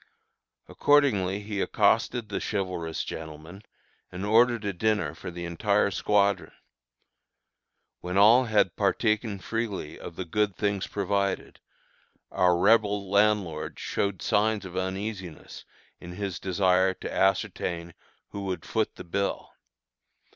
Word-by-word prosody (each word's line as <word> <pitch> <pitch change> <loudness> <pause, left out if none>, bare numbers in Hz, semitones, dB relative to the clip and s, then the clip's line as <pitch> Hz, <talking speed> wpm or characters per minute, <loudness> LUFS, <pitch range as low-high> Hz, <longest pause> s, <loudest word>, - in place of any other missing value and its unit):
Accordingly 105 -10 +2
he 105 -1 -3
accosted 120 -3 +1
the 100 - -2
chivalrous 90 -5 -3
gentleman, 80 +4 -8 0.5
and 90 +2 -5
ordered 115 +1 +3
a 100 - -1
dinner 105 +2 0
for 85 - -8
the 85 0 -6
entire 100 +4 +1
squadron. 100 +1 +1 1.5
When 90 +2 -3
all 115 +6 +7
had 105 -6 +2
partaken 105 +1 0
freely 105 -5 -4
of 85 - -9
the 95 - -5
good 105 +3 0
things 100 -2 -1
provided, 100 -1 -2 0.7
our 90 -1 +3
Rebel 105 0 +3
landlord 100 -6 +1
showed 100 -2 -2
signs 105 -1 +1
of 95 -1 -9
uneasiness 95 -1 -5 0.3
in 90 - -9
his 95 -2 -4
desire 95 0 +2
to - - -7
ascertain 90 -4 0 0.4
who 100 -1 -6
would 95 -1 -4
foot 110 -1 -1
the - - -9
bill. 100 +3 -3
100 Hz, 120 wpm, -27 LUFS, 90-105 Hz, 1.5 s, all